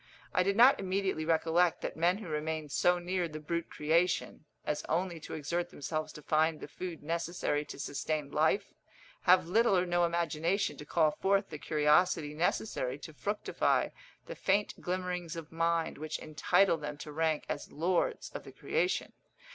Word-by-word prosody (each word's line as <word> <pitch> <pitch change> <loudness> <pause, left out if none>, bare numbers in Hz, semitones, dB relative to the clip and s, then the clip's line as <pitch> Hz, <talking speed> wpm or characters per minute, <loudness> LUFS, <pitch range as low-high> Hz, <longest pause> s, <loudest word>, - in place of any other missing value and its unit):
I 185 - +3
did 195 +2 +1
not 250 +4 +7
immediately 190 -4 -1
recollect 165 +1 +2
that - - -4
men 175 +4 +2
who 210 -3 -8
remain 155 0 -3
so 175 +5 +3
near 175 0 -1
the 155 -1 -7
brute 170 +2 -3
creation, 165 +1 0 0.2
as 150 - -1
only 170 0 0
to - - -7
exert 170 +3 -2
themselves 155 +1 -4
to 150 - -11
find 155 +1 +2
the - - -7
food 170 +2 -7
necessary 165 -2 -1
to - - -9
sustain 145 +1 -3
life, 160 +7 +1 0.5
have 180 0 +6
little 210 +1 +4
or 180 - +2
no 175 0 +2
imagination 170 +2 0
to 150 - -9
call 155 -1 +3
forth 195 +4 +1
the 150 - -7
curiosity 150 +1 +2
necessary 150 -5 -1
to 155 +2 -10
fructify 205 +7 0 0.4
the - - -6
faint 205 +1 +1
glimmerings 180 -2 -3
of 165 -2 -8
mind 165 -1 0
which 155 0 -3
entitle 165 +3 +2
them 150 -1 -6
to 150 - -8
rank 160 0 0
as 145 - -5
lords 170 +4 0
of - - -7
the - - -11
creation. - - -1
165 Hz, 170 wpm, -32 LUFS, 155-180 Hz, 0.5 s, not